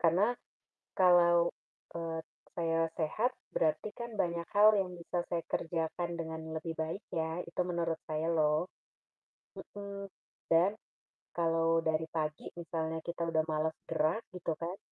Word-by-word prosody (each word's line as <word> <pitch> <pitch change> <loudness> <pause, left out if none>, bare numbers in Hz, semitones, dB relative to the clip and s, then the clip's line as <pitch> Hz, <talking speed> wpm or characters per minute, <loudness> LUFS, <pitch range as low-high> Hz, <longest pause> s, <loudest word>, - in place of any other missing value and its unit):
Karena 185 +8 +4 0.6
kalau, 175 -2 +6 0.5
eee, 165 -1 -3 0.3
saya 165 -1 +1
sehat 210 +11 +1 0.2
berarti 160 +6 +2
kan 235 -1 -5
banyak 170 -4 0
hal 210 +1 +9
yang 190 -2 0
bisa 175 0 -3
saya 170 -1 0
kerjakan 165 +1 -1
dengan 160 -1 -4
lebih 165 +1 -4
baik 160 +5 -2
ya, 160 +1 -1
itu 170 - -2
menurut 170 -2 0
saya 155 +1 -1
loh. 155 +1 +2 0.9
Mhm, 200 -1 -7 0.4
dan 170 +4 +5 0.6
kalau 165 -1 +3
dari 160 0 +1
pagi 155 -2 -2
misalnya 160 -1 -2
kita 170 -1 -2
udah 160 -1 +2
males 155 +1 0
gerak 160 +9 +1
gitu 175 -2 -2
kan 170 +4 -4
165 Hz, 135 wpm, -33 LUFS, 160-175 Hz, 0.9 s, hal